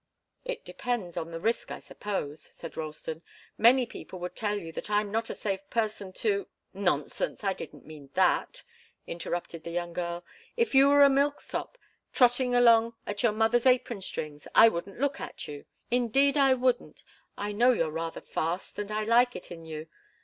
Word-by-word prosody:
"It - - -5
depends 230 -9 -3
on 165 - -3
the 165 0 -6
risk, 230 +6 -1
I - - -5
suppose," 160 -8 -5
said 165 - -10
Ralston. 155 +1 -5 0.3
"Many 245 +3 +5
people 190 - -9
would 180 0 -6
tell 210 -1 -1
you 165 -5 -7
that 165 - -6
I'm 210 -1 +1
not 225 +1 -1
a - - -4
safe 195 -1 -3
person 215 -4 -2
to 400 -2 +1
" - - -49 0.2
"Nonsense! - - -3
I 195 -1 +1
didn't - - -10
mean 150 -3 -12
that," 190 - +2 0.4
interrupted 170 -1 -4
the - - -6
young 175 0 -3
girl. 175 0 -4 0.3
"If 465 -7 +1
you 270 +1 +7
were 285 0 +7
a 280 - +8
milksop, 285 - -1 0.4
trotting 245 -1 +4
along 230 -1 +5
at 205 0 -3
your 235 - +4
mother's 225 +3 +2
apron 250 -4 +2
strings, 150 -5 -5
I 230 - +9
wouldn't 195 +1 -6
look 280 0 0
at - - -7
you. 145 -1 -8 0.3
Indeed, 250 +4 +3
I 270 -2 +5
wouldn't! 250 -1 -1 0.3
I 205 +1 -3
know 240 +5 +4
you're 165 -10 0
rather 165 +1 -4
fast, 170 +6 -3
and 205 0 -4
I 215 0 -1
like 240 +3 +4
it - - -8
in 165 -1 -9
you. 155 -1 -6
210 Hz, 185 wpm, -29 LUFS, 170-245 Hz, 0.4 s, I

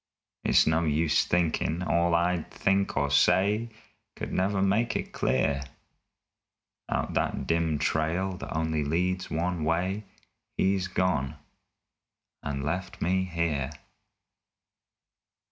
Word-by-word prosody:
It's - - +5
no 80 +1 +2
use 80 0 +2
thinkin' 85 0 0
all 85 0 +2
I'd 85 0 +1
think 95 -3 0
or 70 0 +1
say 105 +9 +3 0.5
Could - - -5
never 95 +2 +1
make 105 +4 +2
it - - -3
clear. 70 +2 +1 1.3
Out - - -1
that - - -1
dim 85 -2 +1
trail 85 +6 0
that - - -7
only 80 -2 0
leads 90 +5 -1
one 85 0 -1
way 90 +6 0 0.5
He's 95 -1 +1
gone 90 -8 0 1.1
and 70 -1 -3
left 90 +6 -3
me 95 +2 +1
here! 85 -6 -1
85 Hz, 110 wpm, -28 LUFS, 80-95 Hz, 1.3 s, It's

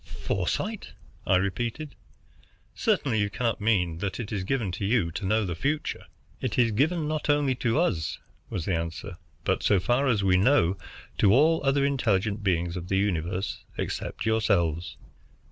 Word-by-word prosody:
"Foresight!" 215 -1 -2 0.3
I - - +4
repeated. 115 - -2 0.8
"Certainly 145 - +1
you 105 0 +1
cannot 115 +1 -1
mean 90 -7 +1
that 100 +3 -3
it 115 -3 -5
is 100 -3 -2
given 110 -3 -1
you 100 -4 +1
to 95 - -5
know 110 +1 +2
the 90 - -2
future?" 145 - -2 0.4
"It - - -2
is 120 -2 +4
given 155 +8 +1
not 155 0 -2
only 145 -2 +3
to 120 +3 +1
us," 85 - 0 0.3
was 80 - -3
the 95 - 0
answer, 85 +3 -4 0.3
"but, - - 0
so 100 - +3
far 120 +9 +1
as 110 -6 +2
we 95 -1 +4
know, 95 -4 +4 0.4
to 100 - +5
all 155 +7 +4
other 140 0 +2
intelligent 110 -6 +1
beings 85 -2 0
of 90 -1 -5
the 95 - +1
universe 95 -1 -1
except - - -4
yourselves. 95 -7 +1
105 Hz, 160 wpm, -27 LUFS, 90-135 Hz, 0.8 s, to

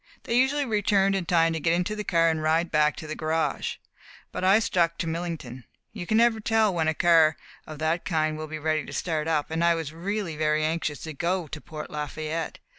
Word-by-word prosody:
They - - -3
usually 270 +3 +2
returned 200 -3 +2
in 190 -3 -2
time 165 -1 +3
to 160 - -2
get 165 +2 +1
into 180 +5 -1
the 210 - -4
car 165 -4 +3
and 160 -1 -2
ride 160 +2 +1
back 150 -1 +3
to - - -8
the 155 - -4
garage. 160 +1 -1 0.6
But - - -5
I 190 +3 +6
stuck 170 -6 +1
to - - -2
Millington. 160 -7 -5 0.3
You 185 -5 -7
never 225 +1 +4
can - - -8
tell 220 -2 +2
when 165 -2 0
a 160 - +1
car 165 -2 +4 0.3
of 155 - -8
that 160 +3 -1
kind 155 -3 0
will 155 0 -6
be 155 0 -5
ready 155 0 0
to - - -10
start 160 -3 -2
up, 155 -2 0
and 165 +1 0
I 170 0 +4
was 160 -2 -5
really 185 0 -3
very 155 0 +1
anxious 155 -4 -2
to 160 - -6
go 175 +4 -1
to 150 0 -8
Port 155 -1 -8
Lafayette. 155 +2 -4
165 Hz, 225 wpm, -26 LUFS, 155-185 Hz, 0.6 s, I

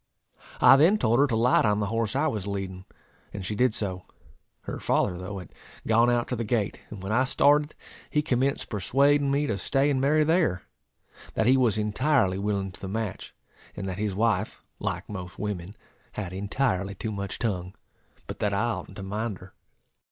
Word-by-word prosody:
I 135 - +8
then 170 +9 +5
told 120 - +2
her 145 - +5
to 120 - -1
light 120 +3 +4
on 105 -1 +2
the 105 - 0
horse 115 +1 0
I 140 +3 +2
was 105 -10 -2
leading; 95 -2 -5 0.5
and 95 - -5
she 105 - -2
did 125 +4 +3
so. 95 -3 -2 0.6
Her - - -6
father, 90 - +1
though, 95 +3 -6
had 90 - -10 0.3
gone 115 +2 +4
out 120 -1 +1
to 125 - -1
the 120 - -2
gate, 110 -2 -1
and 100 -3 -9
when 95 - -4
I 125 +4 +3
started 145 +3 +3 0.3
he 150 - +1
commenced 135 -1 0
persuading 140 +8 +2
me 140 +2 +1
to 110 -7 -2
stay 140 +2 +2
and 130 -2 0
marry 155 +3 +3
there; 160 - +1 0.7
that 110 - +1
he 130 +3 +5
was 120 -5 +2
entirely 105 -2 +1
willing 100 -1 -1
to - - -15
the 95 - -5
match, 105 -1 -4 0.4
and 95 - -5
that 95 0 -4
his 105 -2 -1
wife, 110 -1 0 0.2
like - - -3
most 90 -3 -7
women, 100 -2 -4 0.4
had 95 -4 -5
entirely 100 -1 -1
too 110 +4 -4
much 100 -1 -4
tongue; 95 -5 -3 0.5
but - - -8
that 100 -1 0
I - - +1
oughtn't - - -7
to 95 - -6
mind 105 +1 -3
her. 90 +1 -15
110 Hz, 195 wpm, -27 LUFS, 95-130 Hz, 0.7 s, I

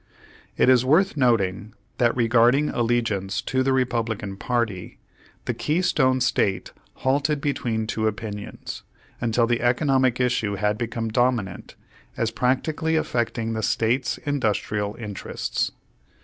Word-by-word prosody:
It - - +4
is 130 -1 +5
worth 165 +9 +3
noting 110 -6 +1 0.2
that 120 0 +2
regarding 120 +5 +4
allegiance 115 -4 0
to 130 +1 0
the 135 +1 +1
Republican 115 -6 -1
party, 110 -4 -2 0.5
the - - -1
Keystone 150 -6 +1
State 100 -6 0 0.3
halted 145 +2 +2
between 120 -6 -1
two 110 0 -1
opinions, 105 -1 -6 0.4
until 120 0 +2
the 120 0 0
economic 130 0 +2
issue 125 -5 +1
had 105 +1 0
become 115 -1 -3
dominant, 115 -4 -1 0.4
as 115 -1 0
practically 150 +7 0
affecting 115 -6 -1
the 110 - -2
State's 120 +4 0
industrial 105 -6 -1
interests. 105 -5 -3
120 Hz, 120 wpm, -24 LUFS, 110-130 Hz, 0.5 s, is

